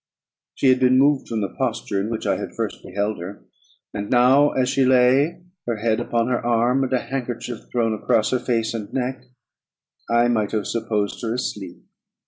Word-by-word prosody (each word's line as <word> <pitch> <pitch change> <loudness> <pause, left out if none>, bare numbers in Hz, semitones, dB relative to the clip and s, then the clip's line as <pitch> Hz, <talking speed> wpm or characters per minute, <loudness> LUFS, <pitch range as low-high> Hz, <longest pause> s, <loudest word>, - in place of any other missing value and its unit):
She 135 - +2
had 130 0 +4
been 130 0 +4
moved 140 0 +3
from 115 -2 -2
the 100 - -2
posture 100 -1 -2
in 105 - -3
which 115 -1 -4
I - - +1
had - - -7
first - - -4
beheld 100 +1 -3
her; 95 +4 -9 0.5
and 100 0 -4
now, 130 +4 +5
as 130 -2 0
she 135 +1 +2
lay, 130 +6 +3 0.2
her 120 - 0
head 110 +1 0
upon 115 0 0
her 125 -1 -1
arm, 120 +3 +2
and 130 - -3
a 130 - +3
handkerchief 125 -2 -5
thrown 115 -2 +1
across 110 0 +1
her 130 - +1
face 115 -2 -1
and 110 -3 -6
neck, 130 0 -3 0.8
I 120 +1 +3
might 110 -3 0
have 105 -2 -1
supposed 110 -3 -2
her 115 -1 -2
asleep. 100 -7 -5
120 Hz, 190 wpm, -22 LUFS, 110-130 Hz, 0.8 s, now